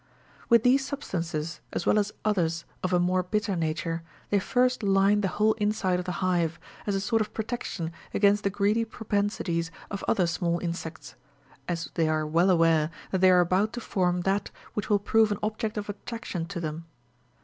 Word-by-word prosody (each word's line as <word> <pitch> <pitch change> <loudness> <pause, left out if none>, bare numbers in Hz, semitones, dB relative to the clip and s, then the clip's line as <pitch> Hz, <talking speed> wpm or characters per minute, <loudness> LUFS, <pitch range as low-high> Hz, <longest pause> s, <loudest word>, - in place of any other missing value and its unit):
With 235 -2 +6
these 265 +2 +4
substances, 170 - -4
as - - -2
well 210 - +4
as 210 0 0
others 170 -6 +1 0.2
of 185 - -1
a 180 - +3
more 180 +1 +2
bitter 205 +2 -1
nature, 165 0 -2 0.3
they 205 - +4
first 250 +5 +1
line 200 0 +3
the 195 - +1
whole 215 +3 +2
inside 205 -3 +1
of 180 - -4
the 180 - -2
hive, 170 -2 +1 0.3
as 200 - +1
a - - +1
sort 225 +3 +1
of 210 0 -4
protection 215 -7 -3 0.2
ag«ainst 205 0 +3
the 200 - +1
greedy 205 +3 +1
propensities 205 -6 -1 0.2
of 200 - -4
other 180 - +3
small 170 0 0
insects, 170 -2 -5 0.5
as 170 -2 -3
they 165 -2 +1
are 155 0 +1
well 165 +5 +3
aware 165 -3 +4 0.2
that 190 - 0
they 185 - +7
are 180 -1 +6
about 190 +5 +1
to 240 - -4
form 180 -5 0
that 195 +2 0 0.2
which 210 - -3
will 205 - +5
prove 215 +2 +3
an 205 - 0
object 215 0 -2
of 205 - -3
attraction 205 -4 -5
to 180 0 -5
them. 160 0 -4
190 Hz, 190 wpm, -27 LUFS, 170-210 Hz, 0.5 s, they